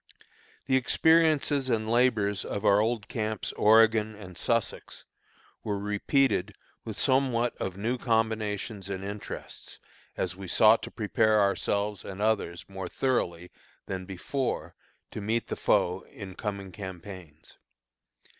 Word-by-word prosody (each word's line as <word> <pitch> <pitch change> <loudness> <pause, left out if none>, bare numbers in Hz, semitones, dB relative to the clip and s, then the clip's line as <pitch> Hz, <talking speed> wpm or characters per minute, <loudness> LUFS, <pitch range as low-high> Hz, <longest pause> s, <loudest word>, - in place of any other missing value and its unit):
The 130 - +2
experiences 150 -1 +3
and 110 -2 0
labors 110 -4 +2
of 100 +1 -4
our 100 0 +6
old 110 -1 -1
camps 110 -3 -3
"Oregon" 110 0 +4
and 95 -4 -11
"Sussex" 115 +3 -2 0.6
were 105 -2 -1
repeated 105 0 +1 0.3
with 110 -2 -6
somewhat 130 -3 +2
of 95 -1 -4
new 120 +5 -1
combinations 110 -3 -1
and 95 -1 -4
interests, 100 +1 -7 0.4
as - - -2
we 95 0 -8
sought 110 +5 +5
to - - -6
prepare 110 0 +2
ourselves 100 +1 0
and 95 0 -8
others 105 -5 0
more 95 -2 -6
thoroughly 90 -10 -1 0.3
than 95 -1 -5
before 120 +8 -3 0.4
to - - -6
meet 110 +3 -1
the - - -2
foe 90 +2 +1
in 95 -3 -9
coming 100 -1 -5
campaigns. 90 -4 -10
105 Hz, 125 wpm, -28 LUFS, 100-115 Hz, 0.6 s, our